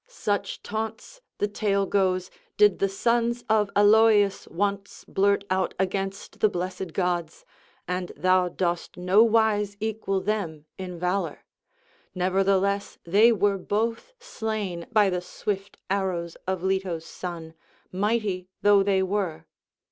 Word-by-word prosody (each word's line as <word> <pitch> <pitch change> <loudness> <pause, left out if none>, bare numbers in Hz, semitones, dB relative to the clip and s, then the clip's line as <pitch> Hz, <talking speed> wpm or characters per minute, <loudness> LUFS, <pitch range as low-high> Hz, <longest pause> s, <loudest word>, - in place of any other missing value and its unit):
Such 205 - -3
taunts, 220 - -5 0.2
the 205 - 0
tale 200 -1 0
goes, 185 -2 0 0.3
did 210 -3 +5
the 195 - +2
sons 235 +4 0
of 215 -2 +2
Aloeus 205 -1 +5
once 200 +3 -3
blurt 200 +1 +2
out 185 -1 0
against 195 +1 -3
the 215 - +4
blessed 180 -1 -4
gods, 175 -3 -2 0.4
and 180 0 -3
thou 185 -1 +3
dost 175 -1 -2
no 180 +4 +4
wise 215 -3 +2
equal 215 -3 -1
them 185 -7 -3
in 180 -2 -6
valour; 180 +3 -2 0.7
nevertheless 195 +2 +1
they 205 +7 +5
were 200 -2 +1
both 225 - -2
slain 220 - -4
by 210 -3 +4
the 180 -1 -1
swift 195 +2 -5
arrows 185 -4 -2
of 190 -1 -2
Leto's 190 -4 -1
son, 165 -3 -7 0.4
mighty 200 -2 -1 0.2
though 205 -1 +6
they 195 -1 +2
were." 190 -4 -2
195 Hz, 125 wpm, -26 LUFS, 185-210 Hz, 0.7 s, though